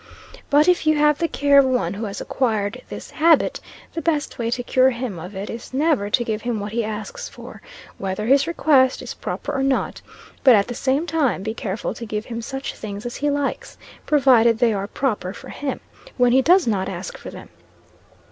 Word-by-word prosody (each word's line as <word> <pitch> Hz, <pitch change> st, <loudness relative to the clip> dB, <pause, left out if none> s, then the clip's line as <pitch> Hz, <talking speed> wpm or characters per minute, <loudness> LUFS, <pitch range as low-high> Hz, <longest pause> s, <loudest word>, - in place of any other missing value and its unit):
But 295 Hz, +3 st, +4 dB
if 355 Hz, -3 st, +3 dB
you 310 Hz, -, +5 dB
have 300 Hz, 0 st, +3 dB
the 335 Hz, -, +1 dB
care 285 Hz, -2 st, +4 dB
of 275 Hz, -, +5 dB
one 250 Hz, -9 st, 0 dB
who 215 Hz, +3 st, -4 dB
has 200 Hz, -1 st, -5 dB
acquired 220 Hz, -2 st, -1 dB
this -, -, -8 dB
habit, 320 Hz, 0 st, +3 dB, 0.3 s
the 330 Hz, -, -3 dB
best 305 Hz, -6 st, -1 dB
way 230 Hz, -1 st, -1 dB
to 245 Hz, +1 st, -2 dB
cure 255 Hz, +1 st, +4 dB
him 240 Hz, -7 st, -4 dB
of 180 Hz, +5 st, -9 dB
it 195 Hz, +2 st, -5 dB
is 235 Hz, +2 st, -8 dB
never 285 Hz, -8 st, +1 dB
to 240 Hz, -, +2 dB
give 220 Hz, -2 st, -3 dB
him 235 Hz, -2 st, -2 dB
what 205 Hz, +1 st, -5 dB
he 230 Hz, +1 st, -1 dB
asks 220 Hz, -, -5 dB
for, -, -, -12 dB, 0.4 s
whether 195 Hz, +2 st, -3 dB
his 275 Hz, +5 st, +4 dB
request 280 Hz, -6 st, +3 dB
is -, -, -6 dB
proper -, -, -5 dB
or 270 Hz, -, -1 dB
not; 270 Hz, -1 st, 0 dB, 0.4 s
but 255 Hz, -4 st, +8 dB
at 200 Hz, -1 st, +2 dB
the 245 Hz, -, -4 dB
same 270 Hz, +5 st, 0 dB
time 300 Hz, -, 0 dB
be 220 Hz, +1 st, -3 dB
careful 210 Hz, -2 st, -4 dB
to -, -, -9 dB
give 210 Hz, 0 st, -3 dB
him 230 Hz, -1 st, -5 dB
such 270 Hz, +3 st, -5 dB
things 205 Hz, 0 st, -7 dB
as 240 Hz, -, -5 dB
he 290 Hz, -, 0 dB
likes, 285 Hz, -1 st, -3 dB, 0.3 s
(provided 250 Hz, -6 st, +5 dB
they 235 Hz, -2 st, +3 dB
are 200 Hz, 0 st, -3 dB
proper 210 Hz, -6 st, -2 dB
for -, -, -11 dB
him,) 285 Hz, -2 st, -4 dB, 0.4 s
when 245 Hz, -1 st, +4 dB
he 260 Hz, +2 st, +5 dB
does 360 Hz, +6 st, +4 dB
not 195 Hz, -5 st, 0 dB
ask 185 Hz, 0 st, -6 dB
for -, -, -9 dB
them. -, -, -11 dB
245 Hz, 215 wpm, -22 LUFS, 215-280 Hz, 0.4 s, but